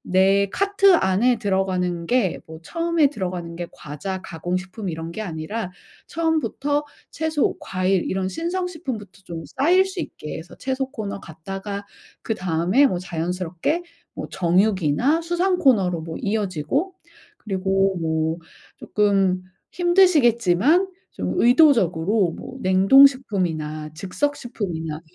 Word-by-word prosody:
내 195 +1 +4
카트 395 -1 +4
안에 230 - +2
들어가는 185 -4 -1
게 240 -8 +1
뭐 160 0 -10
처음에 335 - +1
들어가는 180 -8 -5
게 175 0 -4
과자, 185 +6 -6
가공식품 185 +4 -4
이런 165 0 -5
게 220 - -5
아니라 180 +3 -4 0.4
처음부터 305 -3 0 0.3
채소, 315 -2 0
과일 185 0 0
이런 190 0 -1
신선식품부터 320 - -4
좀 165 -3 -6
쌓일 360 +6 +4
수 380 -1 -6
있게 155 - -6
해서 160 +2 -11
채소 265 0 -3
코너 205 -6 -5
갔다가 195 +5 -7 0.4
그다음에 185 - +2
뭐 185 - -2
자연스럽게 180 - -2 0.3
뭐 - - -6
정육이나 190 - +2
수산 350 +2 0
코너로 195 - +3
뭐 160 0 -7
이어지고 205 - -1 0.4
그리고 195 -1 0
뭐 160 0 0 0.4
쪼끔 195 -3 +1 0.3
힘드시겠지만 315 - +4 0.2
좀 - - -3
의도적으로 215 - +4
뭐 260 - -9
냉동식품이나 185 - +3
즉석식품이나 185 - -3
195 Hz, 280 characters per minute, -22 LUFS, 175-275 Hz, 0.4 s, 내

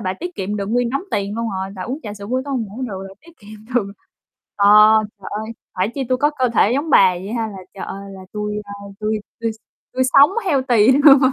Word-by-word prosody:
bà 185 -3 -2
tiết 355 - -7
kiệm 200 +2 -3
được 200 -1 -3
nguyên 240 +2 0
đống 275 +6 -2
tiền 200 +1 -2
luôn 230 0 -2
rồi, 190 0 -4
bà 185 - -6
uống 260 +8 -4
trà 205 -1 -6
sữa 200 -1 -9
buổi 255 +3 -1
tối 285 - -6
hông 240 -4 -1
ngủ 220 +7 -8
được 195 -6 -5
là 195 - -13
tiết 335 +2 -18
kiệm 215 +1 -13
được 200 -5 0 0.6
ờ, 200 0 +3 0.5
trời 190 - -8
ơi, 220 +2 -4 0.2
phải 185 +3 0
chi 275 - -2
tui 255 - +2
có 295 +3 +2
cơ 260 -5 0
thể 215 - +4
giống 290 +4 -1
bà 195 -9 +6
vậy 190 +4 -7
ha, 230 -2 -1
là, 200 -3 -9 0.2
trời 195 - -7
ơi, 195 0 -8
là 190 - -10
tui, 210 0 -3
ơ, 200 - -12 0.3
tui 215 0 -1 0.2
tui 230 -1 0
s - - -16 0.4
tui 260 0 +1
sống 285 +5 +7
healthy 255 - +3
luôn 280 0 +7
220 Hz, 255 wpm, -20 LUFS, 200-260 Hz, 0.6 s, sống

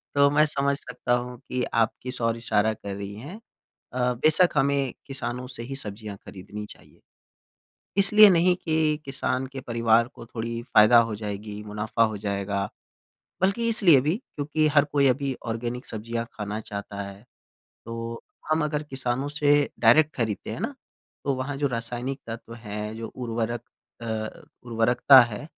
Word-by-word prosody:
तो 140 0 +6
मैं 150 +1 +5
समझ 140 -1 0
सकता 125 0 -3
हूँ 125 0 -2
कि 125 -1 -1
आप 115 -1 +3
किस 125 -1 -5
ओर 115 0 +1
इशारा 110 -2 +1
कर 100 -2 -7
रही 100 0 -6
हैं। 150 - -9 0.5
अ, 125 0 +1
बेशक 155 +8 +4
हमें 140 -1 +2
किसानों 125 -3 -4
से 125 -2 -7
ही 135 +3 -6
सब्ज़ियाँ 105 -4 -5
खरीदनी 105 +2 -8
चाहिए। - - -15 1.0
इसलिए 210 +2 +9
नहीं 180 0 +4
कि 155 -3 0
किसान 135 -1 -2
के 135 - -5
परिवार 115 -1 +2
को 120 - -11
थोड़ी 115 0 -4
फ़ायदा 120 -1 +6
हो 110 - -4
जाएगी, 105 0 -6
मुनाफ़ा 105 +2 -1
हो 110 -1 -1
जाएगा। 100 0 -2 0.7
बल्कि 215 +5 +2
इसलिए 185 - +6
भी 150 +7 0 0.2
क्योंकि 155 +1 0
हर 145 -1 +4
कोई 145 -1 +2
अभी 135 +1 0
ऑर्गेनिक 120 +2 -4
सब्ज़ियाँ 115 +2 -4
खाना 105 0 -4
चाहता 100 -1 -7
है। 100 +1 -9 0.6
तो 115 0 -6 0.3
हम 155 0 +2
अगर 150 0 -1
किसानों 130 +1 -2
से 145 0 0 0.3
डायरेक्ट 145 +7 +5
खरीदते 110 -4 -2
हैं - - -5
ना, - - -3 0.5
तो 140 - +1
वहाँ 130 +2 -4
जो 145 +1 0
रासायनिक 120 +3 -4
तत्व 115 0 -7
हैं 105 -1 -6
जो 115 0 -6
उर्वरक 120 -1 -3 0.4
अ, - - -5 0.6
उर्वरकता 120 +3 +6
है 120 +3 -5
120 Hz, 160 wpm, -26 LUFS, 110-140 Hz, 1.0 s, इसलिए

